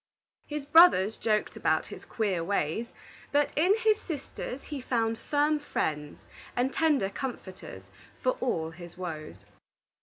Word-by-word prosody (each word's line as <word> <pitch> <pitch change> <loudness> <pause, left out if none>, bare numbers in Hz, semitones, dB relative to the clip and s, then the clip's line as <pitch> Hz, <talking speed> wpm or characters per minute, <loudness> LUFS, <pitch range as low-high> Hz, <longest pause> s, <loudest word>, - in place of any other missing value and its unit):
His 295 -2 -4
brothers 285 - +6
joked 215 -2 0
about - - +1
his - - -10
queer 195 -7 -1
ways, 200 +4 -1 0.4
but 290 0 +2
in 360 +7 +4
his 435 -1 +2
sisters 275 -4 -6
he 290 -3 -6
found 230 -2 0
firm 295 +3 +1
friends 150 - -3 0.4
and 255 +2 0
tender 295 -12 +2
comforters 195 -6 -7 0.4
for - - +2
all 165 -10 -1
his 175 +1 -12
woes. 160 -4 -7
235 Hz, 130 wpm, -29 LUFS, 185-295 Hz, 0.4 s, brothers